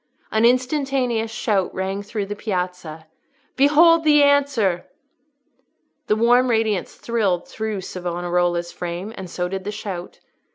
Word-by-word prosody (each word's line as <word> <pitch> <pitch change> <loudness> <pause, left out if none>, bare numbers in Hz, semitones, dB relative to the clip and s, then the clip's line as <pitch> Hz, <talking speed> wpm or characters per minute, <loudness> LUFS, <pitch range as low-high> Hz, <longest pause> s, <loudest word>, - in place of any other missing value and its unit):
An 220 +1 +3
instantaneous 255 -2 +1
shout 210 -4 -1
rang 190 +1 -2
through 205 0 -4
the 205 +1 -5
Piazza, 180 -6 -4 0.5
"Behold 320 +4 +5
the 295 -2 +5
answer!" 275 -11 +2 1.2
The 210 - +3
warm 240 +3 +4
radiance 220 -5 0
thrilled 200 -7 -1
through 215 -3 -4
Savonarola's 175 -1 -2
frame, 175 +5 -5
and 190 -2 -8
so 180 +1 -2
did 190 +1 -5
the 205 - -4
shout. 195 -4 -7
210 Hz, 125 wpm, -22 LUFS, 180-245 Hz, 1.2 s, Behold